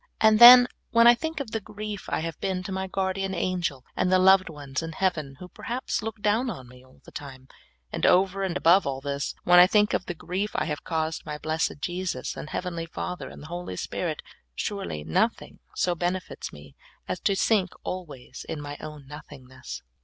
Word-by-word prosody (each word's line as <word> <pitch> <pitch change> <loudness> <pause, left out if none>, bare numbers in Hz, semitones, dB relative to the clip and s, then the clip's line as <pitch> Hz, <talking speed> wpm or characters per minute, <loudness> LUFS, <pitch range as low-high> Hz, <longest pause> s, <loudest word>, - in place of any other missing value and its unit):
And 220 0 +5
then, 245 +1 +11 0.2
when 230 0 +5
I 240 - +9
think 320 +6 -4
of 265 -6 -5
the 225 - -1
grief 210 0 -7
I - - -1
have 165 -2 -5
been 185 -1 -2
to 190 - -6
my 190 0 -3
Guardian 190 0 -2
Angel, 170 -8 -2
and 180 - +1
the 185 - +6
loved 190 0 +5
ones 145 -4 -5
in 165 0 -6
heaven 155 -7 -1
who 180 - -9
perhaps 240 +7 -4
look 220 -1 -6
down 220 +5 +2
upon 130 - -7
me 125 0 -16
all 130 0 -22
the - - -13
time; 130 -2 -9 0.4
and - - -5
over 195 +2 +3
and 185 -2 -1
above 180 +1 +4
all 135 -1 -2
this, 140 0 -3
when 175 0 +7
I 180 - +9
think 210 +1 +3
of - - -1
the 175 - -4
grief 190 +6 -3
I 150 - 0
have 150 -2 -4
caused 160 0 -2
my 150 0 -5
blessed 160 +1 -1
Jesus, 180 +2 -3
and 150 - -7
heavenly 170 -2 -4
Father, 180 +2 -5
and - - -12
the 160 +3 -9
Holy 175 - -5
Spirit, - - -4 0.3
surel}' 195 - -4
nothing 80 - -1 0.2
so 180 - +1
benefits 180 +1 -3
me 75 -1 -14 0.3
as - - -3
to 200 - +1
sink 195 -2 +2
always 150 -9 -7
in - - -3
mj 145 0 -7
own 150 -2 -9
nothingness. 130 -2 -10
180 Hz, 205 wpm, -26 LUFS, 150-195 Hz, 0.4 s, then